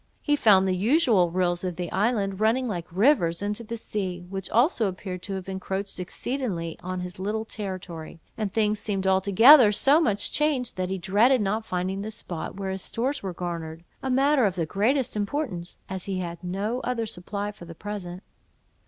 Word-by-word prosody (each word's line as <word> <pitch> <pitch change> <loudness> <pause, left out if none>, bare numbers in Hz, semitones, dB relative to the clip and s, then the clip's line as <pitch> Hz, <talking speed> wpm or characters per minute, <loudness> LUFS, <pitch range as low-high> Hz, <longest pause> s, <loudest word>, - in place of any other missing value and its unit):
He 295 - +3
found 200 -8 +5
the 185 - +1
usual 220 - +3
rills 175 0 0
of 180 -2 -2
the 175 -1 -4
island 200 -3 0
running 230 +4 +2
like 175 -6 -4
rivers 190 - +3
into 210 +3 -2
the 230 +1 -5
sea, 185 -5 -4
which 190 0 -5
also 235 - +3
appeared 185 -1 -5
to 195 +1 -5
have 190 -1 -6
encroached 190 0 -4
exceedingly 180 - -3
on 185 0 -4
his 180 0 -7
little 215 +3 -2
territory; 185 -7 -6 0.2
and 215 -3 -2
things 215 0 +1
seemed 195 -2 -2
altogether 205 +6 +7
so 280 +9 +4
much 205 -10 +1
changed, 295 -5 0
that 185 -1 -2
he 190 - -2
dreaded 210 +8 +3
not 215 +2 -1
finding 185 +2 -2
the 215 - -4
spot 185 -6 -6
where 195 -1 -3
his 190 0 -4
stores 265 +8 -2
were 190 - -4
garnered, 170 -2 -5 0.2
a 265 - -3
matter 270 0 +3
of 190 - -3
the 170 -3 -1
greatest 240 - +1
importance, 205 - -3
as 190 -1 -5
he 195 -2 -2
had 170 -1 -5
no 200 +7 -2
other 245 -3 -2
supply 205 0 -4
for 190 -4 -13
the 165 0 -10
present. 190 -2 -6
195 Hz, 190 wpm, -26 LUFS, 180-225 Hz, 0.2 s, altogether